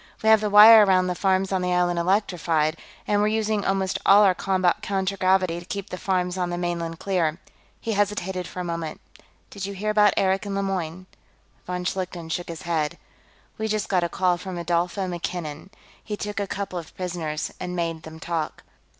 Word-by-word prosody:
We 220 - +4
have 220 -1 +6
the 210 - 0
wire 215 +2 +10
around 185 -2 +3
the 180 - -1
farms 190 +1 +1
on 190 -1 0
the 180 0 0
island 175 -1 +1
electrified, 170 -4 +1 0.3
and 205 0 +2
we're 210 - +3
using 215 -1 0
almost 195 -1 0
all 205 +2 +7
our 190 -2 +5
combat 185 -1 +1
contragravity 190 -2 +1
to 175 - -12
keep 200 0 -5
the 185 - -4
farms 185 -1 -1
on 180 -1 0
the 175 - -3
mainland 170 -1 -3
clear." 170 -5 0 0.4
He 225 - -3
hesitated 195 -3 -1
for - - -8
a - - -2
moment. 170 -2 -4 0.5
"Did 195 -1 -5
you 200 - -6
hear 215 +3 -1
about 210 -1 +4
Eric 195 +1 +1
and 200 - -3
Lemoyne?" 185 -3 -3 0.6
Von 180 0 -3
Schlichten 180 -3 -3
shook 175 +1 -3
his 165 -2 -7
head. 160 -3 -1 0.6
"We 220 - -1
just 215 -1 -2
got 185 -3 +2
a 170 - -1
call 180 0 +1
from 185 -1 -6
Rodolfo 175 +3 -1
MacKinnon. 175 -2 -5 0.3
He 210 -1 -5
took 205 -1 -4
a 200 - -2
couple 195 -2 -4
of 165 - -12
prisoners 165 -4 -3
and 180 0 -4
made 165 -2 -2
them 160 0 -11
talk. 165 -2 -3
185 Hz, 195 wpm, -24 LUFS, 175-200 Hz, 0.6 s, wire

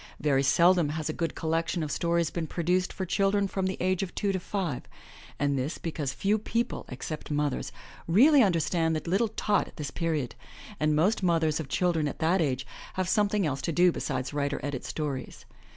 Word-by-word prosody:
Very 140 -2 +2
seldom 170 +3 +4
has 155 0 -3
a - - -1
good 165 0 -2
collection 165 +1 -1
of 150 - -3
stories 170 0 +1
been 165 -2 -3
produced 180 +3 0
for 190 - -4
children 195 +2 +2
from 190 -1 -1
the 190 - -3
age 185 0 +1
of 190 -2 -5
two 200 -2 0
to 190 - -1
five 175 -7 -3 0.3
— - - -19
and 140 -1 +1
this 140 +6 -2
because 155 -5 -3
few 205 +9 +1
people, 230 +3 -2
except 150 +5 -6
mothers, 145 -2 -1 0.4
really 265 - +6
understand 165 -4 +2
the 155 - -4
little 195 +7 +2
tot 210 -1 0
at - - -16
this 145 -2 -4
period, 160 -7 -1 0.5
and 150 0 +2
most 190 +9 +2
mothers 165 -4 +2
of 150 -4 -5
children 165 -1 +1
at - - -5
that 170 +3 +2
age 130 -4 0 0.3
have 185 -1 -1
something 205 0 +2
else 140 -3 -1
to 170 - -1
do 175 +3 +4
besides 130 -4 -3
write 145 -1 0
or - - -4
edit 145 -3 -3
stories. 145 -4 -4
165 Hz, 200 wpm, -28 LUFS, 150-185 Hz, 0.5 s, really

